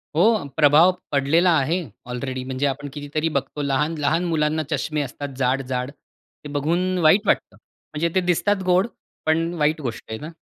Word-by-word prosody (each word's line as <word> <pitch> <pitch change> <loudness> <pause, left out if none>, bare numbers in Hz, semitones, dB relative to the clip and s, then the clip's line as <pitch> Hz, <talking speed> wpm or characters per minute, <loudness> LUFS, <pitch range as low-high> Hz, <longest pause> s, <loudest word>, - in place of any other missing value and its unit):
हो, 210 +3 +3
प्रभाव 155 +4 +6 0.2
पडलेला 155 +6 +3
आहे 170 +7 0 0.2
ऑलरेडी 130 +1 -4
म्हणजे 130 +2 -2
आपण 145 +1 -4
कितीतरी 150 +2 -2
बघतो 140 +2 -4
लहान-लहान 150 +3 0
मुलांना 155 -2 0
चष्मे 150 0 -1
असतात 145 +1 -5
जाड-जाड. 130 0 -1
ते 145 0 -17
बघून 170 +6 0
वाईट 185 +7 +5
वाटतं. - - +1 0.4
म्हणजे 165 +3 0
ते 185 - +4
दिसतात 190 +3 +1
गोड, 185 +4 +3 0.4
पण 165 +2 +1
वाईट 155 +1 +1
गोष्ट 120 -4 -5
आहे 110 - -4
ना, 155 - -7
150 Hz, 155 wpm, -22 LUFS, 140-170 Hz, 0.4 s, प्रभाव